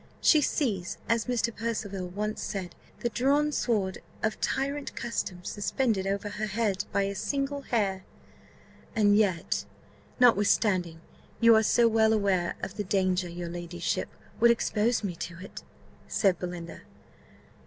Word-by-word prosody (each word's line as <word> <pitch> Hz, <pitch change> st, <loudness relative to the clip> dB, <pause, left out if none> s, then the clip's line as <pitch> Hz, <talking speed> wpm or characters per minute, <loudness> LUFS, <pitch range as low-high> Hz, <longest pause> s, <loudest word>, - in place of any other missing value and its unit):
She 310 Hz, -, +5 dB
sees, 210 Hz, -, -1 dB
as 230 Hz, -1 st, +1 dB
Mr. 235 Hz, -2 st, 0 dB
Percival 205 Hz, -4 st, -3 dB
once 210 Hz, +4 st, -3 dB
said, 185 Hz, -3 st, -4 dB, 0.3 s
'the 240 Hz, -, 0 dB
drawn 280 Hz, +5 st, +2 dB
sword 205 Hz, -9 st, 0 dB, 0.2 s
of 220 Hz, 0 st, -1 dB
tyrant 280 Hz, +1 st, -2 dB
custom 185 Hz, -6 st, -3 dB
suspended 205 Hz, -1 st, -1 dB
over 200 Hz, +1 st, -1 dB
her 210 Hz, +1 st, -3 dB
head 205 Hz, -2 st, -1 dB
by 200 Hz, -, +2 dB
a 200 Hz, 0 st, -2 dB
single 280 Hz, +6 st, -2 dB
hair.'" 200 Hz, -7 st, -1 dB, 0.9 s
"And 205 Hz, -2 st, +4 dB
yet, 170 Hz, -, +1 dB, 0.6 s
notwithstanding 200 Hz, -7 st, +3 dB, 0.4 s
you 230 Hz, -1 st, +7 dB
are 220 Hz, -, +6 dB
so 235 Hz, +2 st, +4 dB
well 220 Hz, -1 st, +4 dB
aware 195 Hz, -5 st, +1 dB
of 195 Hz, -, -5 dB
the 205 Hz, -, -1 dB
danger, 185 Hz, -2 st, +1 dB
your 170 Hz, 0 st, -5 dB
ladyship 175 Hz, 0 st, -3 dB, 0.3 s
would 235 Hz, +1 st, +6 dB
expose 230 Hz, 0 st, +1 dB
me 185 Hz, -4 st, -3 dB
to 170 Hz, 0 st, -6 dB
it?" 185 Hz, +3 st, -9 dB, 0.5 s
said 190 Hz, -4 st, +2 dB
Belinda. 175 Hz, -2 st, -6 dB
205 Hz, 140 wpm, -28 LUFS, 185-230 Hz, 0.9 s, you